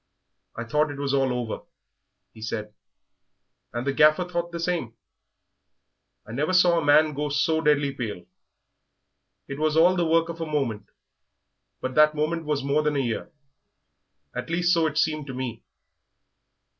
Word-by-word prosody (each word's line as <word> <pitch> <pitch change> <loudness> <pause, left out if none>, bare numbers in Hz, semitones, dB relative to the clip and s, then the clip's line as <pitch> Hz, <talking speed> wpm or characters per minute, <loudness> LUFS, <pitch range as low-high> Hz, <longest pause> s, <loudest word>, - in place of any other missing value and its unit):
"I 115 - -4
thought 150 +6 +1
it 145 - -7
was 140 -1 -2
all 135 -2 +2
over," 120 -3 -4 0.7
he 110 - -14
said, 110 -1 -5 1.0
"and 120 +2 -4
the 140 - 0
Gaffer 155 +5 +5
thought 170 -1 -3
the 170 - -5
same; 165 -10 -2 1.3
I 105 - -11
never 150 +9 -1
saw 180 -2 +5
a - - -3
man 150 +1 +4
go 150 +1 -2
so 160 +3 +1
deadly 145 -2 +2
pale. 110 -9 -5 1.2
It 140 +1 -6
was 155 0 +1
all 175 +3 +5
the 175 -2 +1
work 165 0 +3
of 165 0 -6
a - - -1
moment, 115 -9 -2 0.9
but 130 - -3
that 150 +1 +5
moment 160 +2 -1
was 150 -2 -1
more 140 +2 +1
than 150 -1 0
a - - +1
year 120 -4 -3 1.0
at 125 +5 -5
least, 175 +1 +2
so 165 -2 +3
it 150 0 -4
seemed 155 -2 0
to 130 - -6
me. 125 -3 -5
150 Hz, 165 wpm, -25 LUFS, 130-160 Hz, 1.3 s, Gaffer